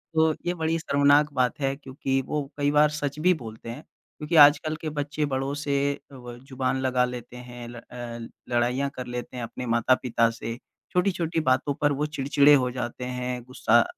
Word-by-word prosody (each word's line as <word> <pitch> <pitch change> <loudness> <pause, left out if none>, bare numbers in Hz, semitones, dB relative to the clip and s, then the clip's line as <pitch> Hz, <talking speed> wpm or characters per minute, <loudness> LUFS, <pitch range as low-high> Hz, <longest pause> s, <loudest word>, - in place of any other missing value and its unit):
तो 160 0 +4
ये 175 - +1
बड़ी 165 -1 -1
शर्मनाक 145 -1 +3
बात 125 0 0
है, 135 -1 0
क्योंकि 135 -1 -2
वो 150 -1 -2
कई 145 0 +1
बार 150 +1 +5
सच 145 -1 -3
भी 180 +4 +4
बोलते 115 -7 -8
हैं, 120 +6 -7 0.4
क्योंकि 150 +2 -3
आजकल 155 +1 +6
के 155 - -3
बच्चे 150 +1 -1
बड़ों 135 +1 -1
से 140 -2 -1 0.4
अव 125 -2 -10
ज़ुबान 130 -1 -1
लगा 125 -1 +2
लेते 125 0 -7
हैं, 120 -1 -9
ल 120 - -10 0.2
अ, 120 -1 -7 0.3
लड़ाइयाँ 125 +4 +1
कर 125 -1 -5
लेते 125 +1 -6
हैं 120 - -4
अपने 120 +2 -6
माता-पिता 120 0 +2
से, 115 0 -5 0.4
छोटी-छोटी 180 -3 0
बातों 135 +3 +2
पर 145 - +3
वो 150 - +2
चिड़चिड़े 140 +2 +5
हो 130 -3 +3
जाते 125 0 -5
हैं, 125 0 -3
गुस्सा 120 -2 +3
135 Hz, 185 wpm, -26 LUFS, 125-150 Hz, 0.4 s, आजकल